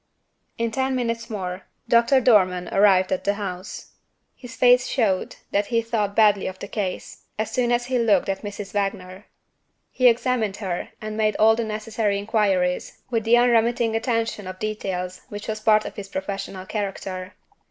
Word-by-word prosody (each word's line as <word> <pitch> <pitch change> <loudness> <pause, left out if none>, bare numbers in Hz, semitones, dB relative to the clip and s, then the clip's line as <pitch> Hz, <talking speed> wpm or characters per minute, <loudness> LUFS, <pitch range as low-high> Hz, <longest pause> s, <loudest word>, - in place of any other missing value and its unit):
In 230 0 -1
ten 265 +2 0
minutes 230 -1 -2
more, 185 -3 -5 0.2
Doctor 235 +3 +4
Dormann 185 -7 +3
arrived 195 -2 +4
at 185 - -1
the 200 0 +1
house. 190 -2 -6 0.4
His 245 -2 -11
face 250 0 +5
showed 205 -8 0 0.2
that 200 0 +1
he 230 -2 +1
thought 210 -3 -1
badly 210 -3 +4
of 190 0 -6
the 200 - -7
case, 195 -3 -5
as 220 0 -2
soon 245 -1 +1
as 240 0 +1
he 250 0 0
looked 210 -5 +3
at 195 -1 -2
Mrs. 205 -1 -7
Wagner. 195 -1 -3 0.6
He 255 - +4
examined 235 -4 +1
her, 185 -4 -4
and 215 0 -5
made 215 -1 +1
all 220 +1 +5
the 235 - -1
necessary 215 -1 -2
inquiries, 200 -4 0
with 225 -2 0
the 235 +2 +5
unremitting 235 -1 +3
attention 225 -2 -1
to 185 - -5
details 185 -4 -4
which 205 0 -7
was 215 -1 -3
part 215 -1 +4
of - - -7
his 200 -1 -7
professional 195 -1 -5
character. 190 -2 -5
215 Hz, 170 wpm, -23 LUFS, 195-230 Hz, 0.6 s, face